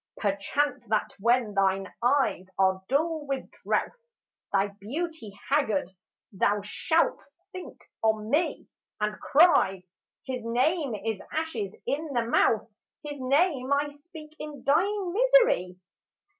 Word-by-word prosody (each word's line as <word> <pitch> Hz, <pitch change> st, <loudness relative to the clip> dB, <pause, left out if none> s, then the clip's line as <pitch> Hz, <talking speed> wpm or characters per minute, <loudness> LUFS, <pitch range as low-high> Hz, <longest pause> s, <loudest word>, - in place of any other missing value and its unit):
Perchance 215 Hz, +9 st, -1 dB
that 215 Hz, 0 st, 0 dB
when 235 Hz, 0 st, +2 dB
thine 195 Hz, -1 st, +1 dB
eyes 245 Hz, -7 st, +1 dB
are 190 Hz, 0 st, +2 dB
dull 310 Hz, +2 st, 0 dB
with 275 Hz, -1 st, -3 dB
drouth, -, -, 0 dB, 0.6 s
Thy 195 Hz, +1 st, +2 dB
beauty 220 Hz, -, -6 dB
haggard, 220 Hz, -11 st, +1 dB, 0.4 s
thou 205 Hz, +1 st, +1 dB
shalt 320 Hz, +10 st, +1 dB, 0.3 s
think 370 Hz, -2 st, -9 dB, 0.2 s
on 220 Hz, 0 st, 0 dB
me 330 Hz, +4 st, 0 dB, 0.3 s
And 210 Hz, 0 st, -2 dB
cry, 275 Hz, -, +4 dB, 0.2 s
" -, -, -57 dB
His 255 Hz, -2 st, -4 dB
name 255 Hz, +3 st, +1 dB
is 220 Hz, -1 st, -3 dB
ashes 255 Hz, -12 st, -3 dB
in 310 Hz, +3 st, -1 dB
the 240 Hz, -2 st, +1 dB
mouth! 225 Hz, -1 st, +2 dB, 0.4 s
His 290 Hz, -1 st, -6 dB
name 275 Hz, 0 st, +2 dB
I 285 Hz, +1 st, +2 dB
speak 305 Hz, +1 st, -13 dB
in 300 Hz, -1 st, -8 dB
dying 370 Hz, +5 st, +1 dB
misery." 465 Hz, -, +4 dB
260 Hz, 125 wpm, -27 LUFS, 205-310 Hz, 0.6 s, cry